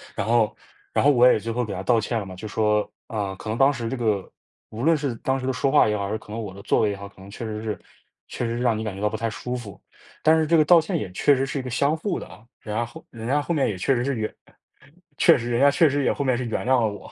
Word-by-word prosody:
然 - - -2
后 115 -3 +2 0.4
然 - - +2
后 145 - +6
我 125 -2 +6
也 - - +2
最 115 - -6
后 125 +2 -1
给 105 - -5
她 90 - -4
道 115 +4 +3
歉 115 +2 -2
了 100 - -5
嘛， 95 -1 -9
就 95 - -9
说， 105 0 +1 0.2
啊， 105 -4 -3
可 105 - -11
能 110 - -2
当 135 +3 +5
时 120 -3 -4
这 135 - -2
个 105 -5 -1 0.4
无 110 +3 -6
论 165 +2 +4
是 140 -4 -2
当 130 +3 -1
时 130 - -4
的 130 - 0
说 135 +2 0
话 - - +5
也 105 - 0
好， 100 - -2
还 - - -5
是 110 - -1
可 105 - -18
能 115 - -4
我 100 -4 -6
的 100 - -11
座 - - +2
位 105 - +2
也 - - -4
好， 100 +1 -8
可 95 - -19
能 100 +1 -12
确 115 - -6
实 110 0 -5
是 110 -1 -3 0.5
确 120 - -4
实 115 +1 -2
让 120 -3 +1
你 110 - -3
感 105 -3 -4
觉 100 - -8
到 105 - +2
不 - - -5
太 115 +1 -1
舒 125 +3 -5
服， 110 -6 -9 0.4
但 160 +1 +6
是 155 - +2
这 165 +2 +3
个 155 - +6
道 170 +2 +7
歉 160 - -2
也 100 -3 -4
确 145 - +4
实 135 +1 0
是 140 - -4
一 - - -1
个 125 - -6
相 140 +5 +1
互 180 +3 -2
的 - - -9
啊， 105 - -15
人 105 -1 -6
家 120 - 0
后 120 - -13
人 115 -1 -8
家 145 +3 +2
后 170 +3 -2
面 140 - +2
也 100 - -4
确 130 +9 +1
实 120 - 0
是 140 +2 -1
原 110 -1 -3 0.8
确 - - +6
实 120 0 -4
人 120 - +1
家 140 - +7
确 145 +3 +4
实 140 0 0
也 - - +2
后 140 - -2
面 130 -2 +2
是 125 - -3
原 115 - -3
谅 130 -1 +3
了 110 - +2
我。 105 - -11
115 Hz, 355 characters per minute, -24 LUFS, 105-135 Hz, 0.8 s, 道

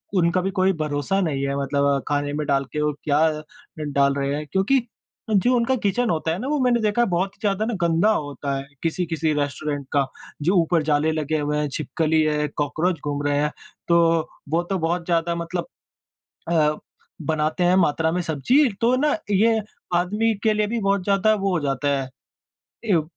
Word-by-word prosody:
उनका 175 +1 +2
भी 190 +2 -2
कोई 190 +1 +3
भरोसा 150 +6 -1
नहीं 140 -6 -1
है 140 - -1
मतलब 140 0 +1
खाने 145 0 -1
में 150 0 -2
डाल 140 0 +2
के 150 - -1
वो 150 - +1
क्या 145 0 +2 0.6
ड 150 -1 -4
डाल 140 0 +3
रहे 140 0 -1
हैं 150 +1 -4
क्योंकि, 195 +8 +3 0.5
जो 220 +4 +3
उनका 240 +2 +2
किचन 230 +1 0
होता 160 0 0
है 170 - -1
ना 255 - -4
वो 295 0 0
मैंने 245 -1 +3
देखा 210 +2 +1
है 240 - +3
बहुत 185 +3 0
ही - - -34
ज़्यादा 205 +1 0
ना 235 - -2
गंदा 170 +5 +3
होता 145 -5 -2
है, 135 0 -7 0.2
किसी-किसी 165 -2 -1
रेस्टोरेंट 145 0 -3
का, 140 -2 +2 0.4
जो 180 +6 +2
ऊपर 165 -1 +2
जाले 150 +1 +2
लगे 155 0 -1
हुए 150 0 -1
हैं 150 0 0
छिपकली 155 +2 0
है 150 -1 +1
कॉकरोच 150 +4 -1
घूम 145 -1 -2
रहे 145 0 +1
हैं 150 0 0 0.4
तो 170 0 +4 0.5
वो 165 +2 +1
तो 190 +2 -2
बहुत 170 +1 -1
ज़्यादा 170 -1 0
मतलब 170 +1 -4 0.8
अ, 155 -2 +3 0.5
बनाते 155 +3 0
हैं 180 +1 +4
मात्रा 160 -2 +2
में 180 - 0
सब्ज़ी, 190 - +2
तो 235 +2 +3
ना 295 +2 +2
ये 220 +3 +3 0.4
आदमी 210 +6 +1
के 220 - +3
लिए 210 0 +1
भी 230 +2 -2
बहुत 195 -1 +1
ज़्यादा 200 +2 +3
वो 195 -1 -1
हो - - 0
जाता 140 +1 -1
है। 130 -1 -6 0.8
ए 185 -7 +3
165 Hz, 195 wpm, -23 LUFS, 150-195 Hz, 0.8 s, तो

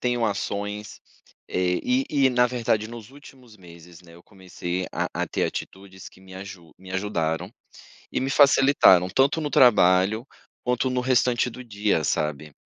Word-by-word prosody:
tenho 120 -2 0
ações, 105 0 -4 0.5
eh, 90 0 0
e 255 +2 +1
e 135 -3 +3
na 125 0 +3
verdade, 115 -3 -1
nos 115 0 -10
últimos 135 -5 -16
meses, 85 -2 -15
né, 85 -1 -17
eu 85 - -17
comecei 90 -2 -6
a - - -2
a - - -1
ter - - -1
atitudes 95 -1 -7
que - - -21
me 95 0 -14
aju 95 -4 -11
me 95 0 -14
ajudaram, 90 -5 -2 0.6
e - - -2
me 135 +1 -2
facilitaram, 135 -10 +5
tanto 135 - +1
no 150 - -2
trabalho, 105 -3 +4 0.4
quanto 125 +1 0
no 125 0 -1
restante 125 -1 +1
do 125 +1 -9
dia, 105 -7 -1
sabe. 75 0 -2
105 Hz, 160 wpm, -24 LUFS, 90-125 Hz, 0.6 s, facilitaram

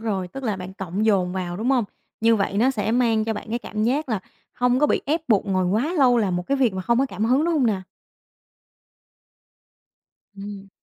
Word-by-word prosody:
rồi, 195 -5 -2
tức 270 +9 -8
là 215 -5 -1
bạn 185 0 -7
cộng 190 +2 -3
dồn 190 -5 +2
vào, 180 -2 -3
đúng 230 +6 -1
hông? 250 -5 +3 0.4
Như 225 0 +4
vậy 200 -1 -1
nó 250 +5 +4
sẽ 220 -4 -1
mang 230 -3 +2
cho 225 - -1
bạn - - -7
cái 235 - -1
cảm 215 -3 -4
giác 275 +5 0
là 220 -5 -1 0.3
không 250 0 +1
có 295 - +4
bị - - +1
ép 315 +4 +1
buộc 210 -2 +3
ngồi 185 -1 +1
quá 225 - 0
lâu 250 -3 +5
làm 190 -5 0
một 180 0 -4
cái 275 - +1
việc 245 -7 +2
mà 185 - -3
không 235 +5 +2
có 270 - +2
cảm 220 - -3
hứng, 260 +6 +3
đúng 340 - +1
hông 275 -6 +2
nè? 205 -4 0 2.6
Ừm. 200 0 -8
220 Hz, 225 wpm, -23 LUFS, 195-250 Hz, 2.6 s, lâu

